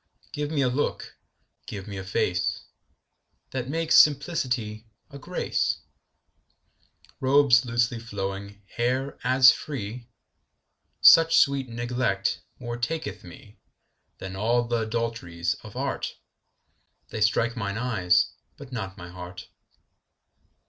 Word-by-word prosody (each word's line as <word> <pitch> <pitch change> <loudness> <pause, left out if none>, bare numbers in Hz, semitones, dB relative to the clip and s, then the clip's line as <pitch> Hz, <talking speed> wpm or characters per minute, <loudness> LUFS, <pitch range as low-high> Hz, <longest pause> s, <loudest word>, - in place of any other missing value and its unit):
Give 145 0 -3
me 150 -3 +1
a - - +3
look, 130 +4 -2 0.5
give 100 -1 -7
me 100 - -6
a 95 - -5
face 90 -2 -1 0.9
That 130 -1 -4
makes 165 +2 +1
simplicity 125 -8 +2 0.2
a 140 - -9
grace; - - -1 1.4
Robes 135 -2 +5
loosely 120 0 0
flowing, 100 -2 -6
hair 130 +4 -1
as 130 0 +7
free: 120 -4 -6 0.9
Such 165 0 +8
sweet 140 -3 +3
neglect 120 -4 -1 0.2
more 120 -2 -5
taketh 120 -4 -3
me 90 +4 -14 0.6
10 95 - -7
Than - - -7
all 120 +4 +1
th' 120 - -4
adulteries 110 -7 -2
of - - -12
art; - - -3 0.9
They 110 - -5
strike 115 +2 +2
mine 100 -3 -3
eyes, 95 -8 +2 0.2
but 140 -2 -11
not 100 -5 -5
my 90 -2 -9
heart. 90 +1 -9
120 Hz, 115 wpm, -26 LUFS, 100-130 Hz, 1.4 s, Such